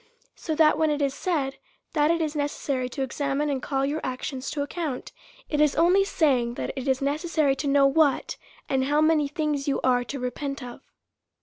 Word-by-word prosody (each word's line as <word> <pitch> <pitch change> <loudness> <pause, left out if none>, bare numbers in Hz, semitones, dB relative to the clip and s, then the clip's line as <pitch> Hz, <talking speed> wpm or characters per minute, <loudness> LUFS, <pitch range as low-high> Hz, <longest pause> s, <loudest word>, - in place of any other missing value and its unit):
So 315 - -3
that, 305 -1 +4
when 315 -1 +3
it 295 -1 0
is 280 -2 0
said, 275 -4 -2 0.4
that 300 -1 +3
it 335 0 +2
is 305 -1 -3
necessary 280 -3 -2
to 270 +2 -3
examine 280 +2 -1
and 265 -2 -2
call 270 0 -1
your 295 +3 -2
actions 255 +1 -4
to 290 -2 -2
account, 290 -3 -4 0.4
it 300 -1 0
is 300 -2 +3
only 360 +4 +4
saying, 255 -10 +1
that - - -3
it 265 0 -5
is 265 0 +1
necessary 300 -1 +1
to 290 - -3
know 275 0 +4
what, 280 0 +2 0.3
and 265 -1 +1
how 295 +2 +2
many 310 -2 +3
things 295 -1 -2
you 280 - +1
are 250 -1 +3
to 275 +3 -5
repent 275 +2 -4
of. 245 -1 -9
285 Hz, 200 wpm, -26 LUFS, 270-305 Hz, 0.4 s, that